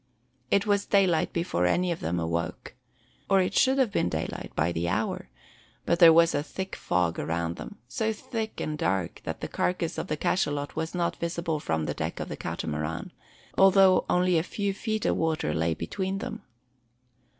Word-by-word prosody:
It 200 +1 +3
was 205 -1 +1
daylight 185 -5 +3
before 130 - 0
any 180 - +1
of 170 - -3
them 85 +2 -1
awoke, 85 0 -3 0.6
or 195 - +5
it 185 - +1
should 265 +1 +4
have 260 -6 +2
been 90 - +1
daylight, 80 -1 -4
by 85 +3 +1
the 85 0 -1
hour: 65 - -2 0.6
but 170 - +1
there 170 -2 +10
was 165 +1 +5
a 145 - +1
thick 190 +5 -5
fog 90 -2 0
around 85 +2 -2
them, - - -8
so 220 - -1
thick 220 0 -5
and 150 -1 -3
dark 95 -2 -1
that - - -4
the - - -3
carcass 180 -2 -1
of - - -4
the 155 - -2
cachalot 145 -4 0
was 160 +2 -3
not 175 -1 0
visible 170 -2 -2
from 80 - -1
the - - -2
deck - - -4
of - - -4
the - - -4
Catamaran, 80 +2 -4 0.5
although 190 -1 +6
only 180 -1 +3
a - - +1
few 200 +3 -2
feet 215 +2 -2
of - - +2
water 160 - 0
lay 80 +1 0
between 190 - -3
them. 225 +1 -5
165 Hz, 185 wpm, -27 LUFS, -, 0.6 s, there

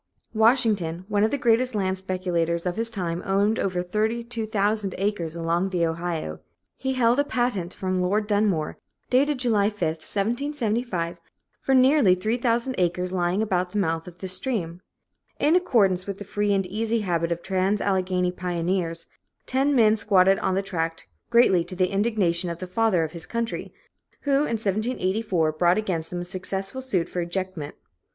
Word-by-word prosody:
Washington, 215 -7 +2
one 205 -1 +2
of 220 - +3
the 285 - -1
greatest 245 0 +2
land 190 -2 0
speculators 180 -3 -1
of 180 -1 -1
his 230 +1 -1
time, 175 -6 -3
owned 200 +3 +1
over 180 -2 -1
32,000 215 0 -1
acres 185 -5 -2
along 170 +3 0
the 175 -3 +1
Ohio. 165 - -3 0.4
He 265 0 -2
held 245 0 +3
a - - +4
patent 240 -10 -1
from 185 -1 -1
Lord 205 +4 +1
Dunmore, 205 -7 0 0.3
dated 280 +3 +3
July 220 -5 +2
5, 210 -1 -15 0.2
1775, 220 - -2 0.4
for 270 - +2
nearly 260 -7 +5
3,000 235 +5 0
acres 180 +1 0
lying 180 +3 +1
about 180 -3 -1
the - - -1
mouth 165 -4 -1
of 175 -1 -11
this 185 0 -1
stream. 180 -9 -1 0.6
In 305 +4 +3
accordance 200 - +2
with 200 -1 -4
the 205 - -8
free 205 +1 -1
and 195 -1 +1
easy 220 +4 -1
habit 170 -3 -1
of 170 0 -2
trans 190 +2 +1
Alleghany 185 -2 0
pioneers, 175 -1 -2 0.4
ten 275 +2 +1
men 220 -3 +5
squatted 195 -2 +4
on 185 - 0
the 195 - 0
tract, 165 - -3 0.2
greatly 210 -7 +5
to 185 +1 -3
the 185 +1 +1
indignation 195 -4 +1
of 170 - -4
the 185 - -6
Father 185 -2 +1
of 155 - -4
his 165 -1 -8
Country, 230 +3 -3 0.5
who 285 +1 +2
in 230 -5 -1
1784 200 -5 0
brought 175 +4 +2
against 175 -7 -2
them 175 0 -4
a - - -3
successful 190 +6 -4
suit 195 -10 0
for 180 - -3
ejectment. 175 -3 -4
195 Hz, 165 wpm, -25 LUFS, 175-225 Hz, 0.6 s, nearly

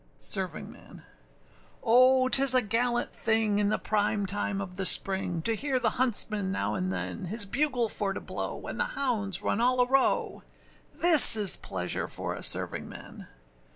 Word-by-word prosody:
SERVINGMAN. - - -5 0.8
O 255 +2 +3
âtis 270 0 +5
a 255 - +3
gallant 240 +3 -3
thing 220 -2 -2
in 205 -1 -1
the - - -2
prime 205 -1 -3
time 200 0 -3
of 185 -2 -9
the 195 - -5
spring, 190 -3 +2
To 225 - -1
hear 265 +3 -3
the 225 -3 -1
huntsman 215 -5 +1
now 200 - -4
and 185 0 -4
than 195 +1 -7
His 205 +4 -2
bugle 255 +1 -2
for 205 -2 -4
to - - -7
blow, - - -8
and - - -9
the - - 0
hounds 220 -8 -1
run 225 - -3
all 250 +1 0
a 250 - +3
row: 270 +1 -1 0.5
This 330 -8 +8
is 205 -3 +4
pleasure 90 -1 -6
for - - -6
a - - -10
servingman! - - -4
220 Hz, 165 wpm, -26 LUFS, 200-255 Hz, 0.8 s, This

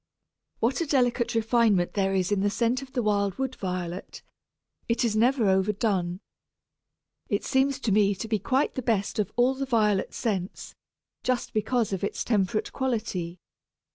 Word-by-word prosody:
What 245 +8 +1
a 335 - -1
delicate 245 -4 +1
refinement 225 -5 +2
there 195 -1 +1
is 185 0 0
in 205 - +2
the 205 - +2
scent 235 +4 0
of 270 -1 -11
the 245 - 0
wild 200 -2 +1
Wood 265 -1 -2
Violet; 180 -1 -5 0.7
it 235 +1 +2
is 220 -2 0
never 240 0 +3
overdone. 190 -2 +1 1.1
It - - 0
seems 270 0 +1
to 225 - 0
me 200 0 +3
to 225 - -5
be 215 -1 0
quite 260 +8 +1
the 260 - -3
best 220 -4 0
of 210 - 0
all 245 +2 +3
the 270 0 -4
violet 210 -5 +1
scents, 195 -5 -3 0.5
just 250 -1 -1
because 220 0 0
of 190 - -3
its 200 - -2
temperate 210 -2 0
quality. 215 -9 -2
215 Hz, 165 wpm, -27 LUFS, 195-245 Hz, 1.1 s, never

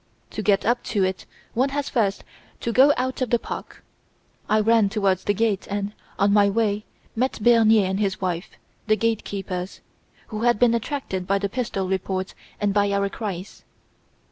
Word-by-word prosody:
To - - -4
get 200 -2 +2
up 240 +2 +2
to 200 -3 0
it 185 0 -2 0.3
one 255 +4 +2
has 285 +1 -2
first 205 -6 0 0.4
to 235 - -1
go 265 +5 +6
out 260 +1 -2
of 255 - 0
the 240 - +4
park. - - -8 0.7
I 215 - +4
ran 220 -1 +4
towards 195 -3 +1
the 205 - +2
gate 215 -2 0
and, 205 0 -2 0.2
on 200 0 +3
my 205 -1 +5
way, 210 0 0 0.3
met 255 +4 0
Bernier 225 -2 +5
and 190 +1 -1
his 195 -2 0
wife, 180 -1 -2 0.4
the 215 -1 +3
gate 225 0 0
keepers, 190 -2 -5 0.5
who 215 -1 -4
had 240 -1 +3
been 235 +1 +4
attracted 230 -6 -3
by 195 - +2
the 200 0 -2
pistol 200 -5 -2
reports 190 0 -2 0.3
and 205 -1 +1
by 205 0 +2
our 200 0 +1
cries. 195 -3 -6
205 Hz, 180 wpm, -24 LUFS, 195-230 Hz, 0.7 s, go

